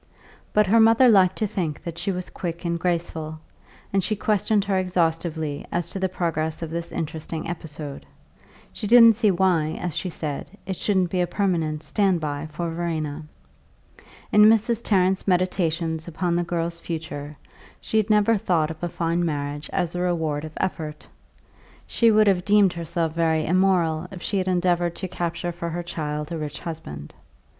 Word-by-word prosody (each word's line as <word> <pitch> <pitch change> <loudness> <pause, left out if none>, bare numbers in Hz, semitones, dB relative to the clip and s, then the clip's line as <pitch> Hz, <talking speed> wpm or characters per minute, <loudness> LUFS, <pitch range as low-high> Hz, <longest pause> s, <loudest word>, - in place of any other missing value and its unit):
But 210 0 +4
her 220 +4 +4
mother 225 +3 +6
liked 190 -5 +5
to 215 - -1
think 170 -7 -3
that 170 -1 -6
she 195 - -1
was 180 -1 -5
quick 170 0 -5
and 170 0 -1
graceful, 165 -3 -2 0.6
and 195 -1 +2
she 215 +4 0
questioned 210 0 +1
her 195 -2 +1
exhaustively 165 -4 -1
as 170 -1 -2
to 195 - -3
the 190 0 0
progress 165 -3 -2
of 160 - -5
this 170 0 -4
interesting 160 0 -4
episode; 150 -4 -7 0.7
she 210 - -4
didn't 230 0 +8
see 215 -1 +3
why, 170 -4 +2
as 175 -4 -3
she 180 +2 -2
said, 155 +4 -5
it 190 - -3
shouldn't 185 -2 +1
be 185 - +1
a 175 - +1
permanent 165 -5 -1
"stand 195 -4 +1
by" 150 0 -3
for 165 +2 -4
Verena. 160 -3 -3 1.1
In 210 0 +7
Mrs. 225 +1 +4
Tarrant's 190 -1 +2
meditations 170 -3 0
upon 170 +1 -1
the 175 - +1
girl's 170 0 -2
future 155 -3 -6 0.4
she 220 - -2
had 215 0 +2
never 210 +1 +4
thought 165 -5 +1
of 160 - -10
a 175 - 0
fine 170 +1 -1
marriage 145 -2 -3
as 175 -3 -1
a 180 - -2
reward 160 -4 -1
of 155 - -9
effort; 155 -5 -3 0.8
she 230 - +3
would 215 -1 +5
have 190 -3 +3
deemed 205 -2 +4
herself 165 -1 -2
very 160 -2 +1
immoral 175 -2 +2
if 185 -2 -9
she 200 - 0
had 185 - -2
endeavoured 175 -1 +1
to 190 - -4
capture 175 -1 -3
for 170 0 -5
her 175 +1 -4
child 150 -2 -4
a 165 - -2
rich 150 -2 -5
husband. 75 - -7
170 Hz, 175 wpm, -24 LUFS, 160-190 Hz, 1.1 s, didn't